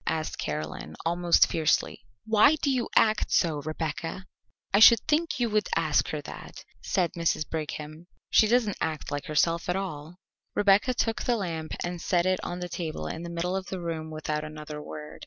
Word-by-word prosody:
asked 160 -1 -2
Caroline, 75 +1 -4
almost 175 +1 +4
fiercely. 155 -7 0 0.2
"Why 220 +7 +5
do 285 -2 0
you 250 -3 -1
act 215 -1 +3
so, 160 -4 +2
Rebecca?" 160 +4 -4 0.5
"I 200 - +5
should 230 +1 +9
think 310 -1 0
you 240 - +2
would 210 0 +1
ask - - +2
her - - -3
that," - - -10 0.2
said 180 -4 0
Mrs. 165 -2 0
Brigham. 155 +1 -6 0.2
"She 215 - +6
doesn't 225 -3 +2
act 155 -2 -3
like 145 0 -3
herself 165 +3 +1
at 180 - +1
all." 170 -4 -5 0.4
Rebecca 205 +5 +4
took 225 -1 0
the 245 - +1
lamp 165 -5 -4
and 175 -1 -4
set 175 -1 +1
it 185 0 +2
on 175 0 -5
the 180 - -3
table 165 - -5
in 160 - -5
the 170 - -6
middle 170 +2 -2
of 190 0 -3
the 190 - -4
room 165 -2 -4
without 155 -1 -3
another 150 -1 -7
word. 150 0 -9
170 Hz, 185 wpm, -27 LUFS, 155-200 Hz, 0.5 s, should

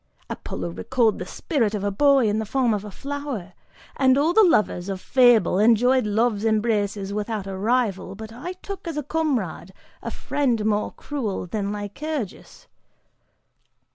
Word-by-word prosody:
Apollo 90 -1 -5
recalled 215 - +1
the - - -5
spirit 230 - -1
of 200 - -3
a 205 - 0
boy 275 +2 +4
in 210 +1 +1
the 220 - -2
form 250 -1 +1
of 205 -1 -2
a 210 - -7
flower, 275 -6 -5 0.4
and 260 -1 +4
all 310 +5 +2
the 440 - +6
lovers 210 - +2
of 190 -1 -3
Fable 235 -6 +4
enjoyed 235 +2 +4
Love's 215 0 +1
embraces 210 -3 0
without 210 -1 -3
a 195 -1 -5
rival, 205 -2 0
but 220 +2 -9
I 290 +10 -6
took 395 -3 -7
as 325 -3 -4
a 300 - -1
comrade 260 - -2 0.3
a - - -4
friend 245 -7 -1
more 210 -1 +1
cruel 235 -11 -4
than 200 +2 -3
Lycurgus!" 220 - -5
220 Hz, 160 wpm, -24 LUFS, 205-265 Hz, 0.4 s, the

